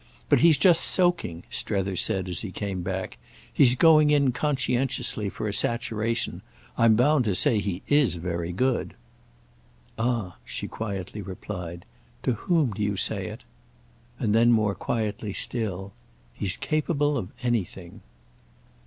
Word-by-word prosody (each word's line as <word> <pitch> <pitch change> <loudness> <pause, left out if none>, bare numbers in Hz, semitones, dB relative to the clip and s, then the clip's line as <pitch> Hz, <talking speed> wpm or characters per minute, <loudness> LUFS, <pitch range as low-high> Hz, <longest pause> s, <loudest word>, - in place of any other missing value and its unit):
But - - +5
he's 165 -2 +5
just 170 +2 +5
soaking," 175 - +1
Strether 95 -2 0
said 95 +1 0
as 90 -3 -3
he 100 - -5
came 95 -1 -4
back; 95 +1 -4 0.3
"he's 125 -2 +5
going 155 +1 +5
in 140 -3 +3
conscientiously 130 -6 -1
for 105 - -5
a 105 - -3
saturation. 115 +1 -1 0.3
I'm 115 -1 +4
bound 135 +4 +3
to 100 -4 0
say 105 +4 +3
he 100 -2 -4
is 145 -8 +3
very 85 0 -3
good." 125 +7 -1 1.0
"Ah," 115 -6 -1
she - - -6
quietly 100 -2 -5
replied, 90 -2 -7 0.4
"to 125 - +1
whom 155 - +1
do 105 - -6
you 105 -1 -1
say - - 0
it?" - - -9 0.7
And 110 -5 0
then 115 +2 +5
more 110 -3 +2
quietly 105 +1 -3
still: 100 -5 -1 0.4
"He's 95 -3 -1
capable 150 -1 0
of 105 -9 -3
anything." 95 -7 -3
110 Hz, 140 wpm, -25 LUFS, 95-130 Hz, 1.0 s, But